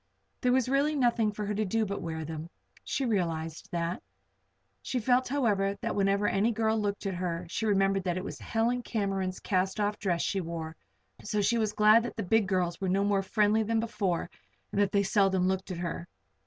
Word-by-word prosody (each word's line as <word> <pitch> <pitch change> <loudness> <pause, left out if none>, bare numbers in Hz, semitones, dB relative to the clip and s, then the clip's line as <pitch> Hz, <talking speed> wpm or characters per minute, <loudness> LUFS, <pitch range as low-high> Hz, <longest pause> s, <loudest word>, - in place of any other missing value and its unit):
There 250 - +3
was 255 -1 +3
really 280 +3 +2
nothing 235 -5 +2
for 210 0 -4
her 210 - -2
to 215 +1 0
do 220 +2 0
but 200 0 -4
wear 160 -2 -4
them. 160 +1 -6 0.3
She 275 - -1
realized 165 -5 -2
that. 170 0 -2 0.8
She 255 - -3
felt, 250 +2 +2
however, 205 -7 +1
that - - -2
whenever 200 +1 +2
any 210 +4 +2
girl 220 -1 +1
looked 205 0 -2
at 195 - -1
her 175 -1 -3
she 220 - -1
remembered 195 -1 +2
that 175 -1 0
it 185 - -3
was - - -6
Helen 235 +2 0
Cameron's 195 -5 -2
cast 190 +1 0
off 210 0 0
dress 175 -4 0
she 195 - 0
wore; 165 -1 -5 0.5
so 210 0 -1
she 230 +4 +2
was 215 -1 0
glad 215 +2 +6
that 240 - -5
the 225 - -3
big 210 +2 +2
girls 180 -1 0
were 190 - 0
no 195 +2 +2
more 200 -1 +2
friendly 210 +2 +2
than 225 +1 +1
before 210 -7 -1 0.4
and 200 - +1
that 200 -2 +2
they 200 0 +3
seldom 195 -2 +2
looked 190 0 -1
at 180 - -4
her. 170 0 -4
200 Hz, 210 wpm, -29 LUFS, 185-220 Hz, 0.8 s, glad